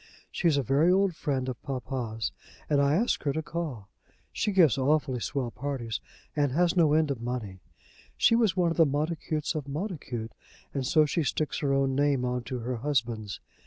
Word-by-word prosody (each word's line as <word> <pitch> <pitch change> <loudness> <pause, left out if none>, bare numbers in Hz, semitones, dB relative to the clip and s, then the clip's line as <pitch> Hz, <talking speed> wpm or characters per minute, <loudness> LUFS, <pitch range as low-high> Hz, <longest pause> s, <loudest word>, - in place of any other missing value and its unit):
She's 165 -5 +2
a 140 - +1
very 145 +8 +3
old 190 -2 +3
friend 135 -5 -1
of 125 -3 -5
papa's, 125 -4 -3 0.4
and 145 -2 +3
I 140 +1 +3
asked 230 +7 +1
her 140 - 0
to 160 - -2
call. 150 - -4 0.5
She 210 - 0
gives 175 - +5
awfully 140 -1 +1
swell 125 0 -2
parties, 125 -4 -3 0.4
and 145 -3 +1
has 175 +3 +2
no 160 -4 +4
end 155 -2 +3
of 125 -4 -4
money. 120 -6 -4 0.6
She - - +5
was 220 -5 +2
one 175 -2 +3
of - - -3
the 165 - +7
Montacutes 155 +1 -1
of 150 -4 -4
Montacute, 140 - -4 0.4
and 135 -3 -1
so 155 +1 +5
she 150 +3 0
sticks 155 0 -1
her 140 -2 0
own 135 -1 +2
name 140 -2 +2
on 125 0 -1
to 130 - -4
her 125 +1 -3
husband's. 115 -6 -1
140 Hz, 190 wpm, -28 LUFS, 125-160 Hz, 0.6 s, the